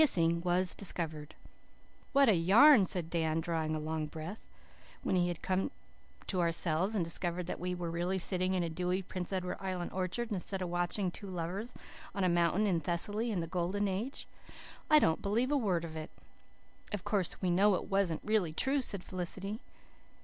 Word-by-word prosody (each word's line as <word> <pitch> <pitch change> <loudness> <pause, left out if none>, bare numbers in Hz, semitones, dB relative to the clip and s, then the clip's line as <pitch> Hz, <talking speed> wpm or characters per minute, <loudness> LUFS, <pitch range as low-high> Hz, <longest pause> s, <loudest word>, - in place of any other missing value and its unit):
Kissing 170 - +4
was 180 +1 +2
discovered! 160 -6 -3 0.8
"What 275 -1 +5
a 220 - +6
yarn!" 200 - +7
said 175 -2 -2
Dan, 160 -1 +1
drawing 160 -1 -1
a - - -2
long 155 0 -3
breath, 160 +7 -8 0.6
when - - 0
we 175 -1 +3
had 175 -2 -4
come 190 +4 0 0.6
to 185 -2 0
ourselves 170 +4 +1
and 180 -5 +1
discovered 175 +1 -1
that 180 - -4
we 180 +1 -2
were 175 -2 -4
really 175 +3 -1
sitting 185 0 0
in 180 - +1
a 170 - -2
dewy 180 +3 -1
Prince 180 0 -5
Edward 180 -1 -2
Island 185 -2 -3
orchard 190 +6 -2
instead 195 0 -2
of 180 -2 -3
watching 175 +2 -1
two 200 +2 -9
lovers 185 +7 -4 0.4
on 195 - 0
a 185 - +3
mountain 175 +4 +2
in 180 -5 +2
Thessaly 205 +8 0
in 195 -6 -1
the - - -2
Golden 180 +4 -1
Age. 205 +8 -4 0.6
"I 305 - +8
don't 160 - +3
believe 230 +7 +1
a - - +3
word 190 -10 +1
of 160 -1 -8
it." 155 0 -5 0.8
"Of 205 -3 -3
course, 195 -5 -1
we 185 -2 0
know 195 +3 +4
it - - -3
wasn't 195 -5 +1
really 210 -7 +1
true," 270 - +2
said 200 -7 -1
Felicity. 190 +5 -3
180 Hz, 185 wpm, -32 LUFS, 170-200 Hz, 0.8 s, I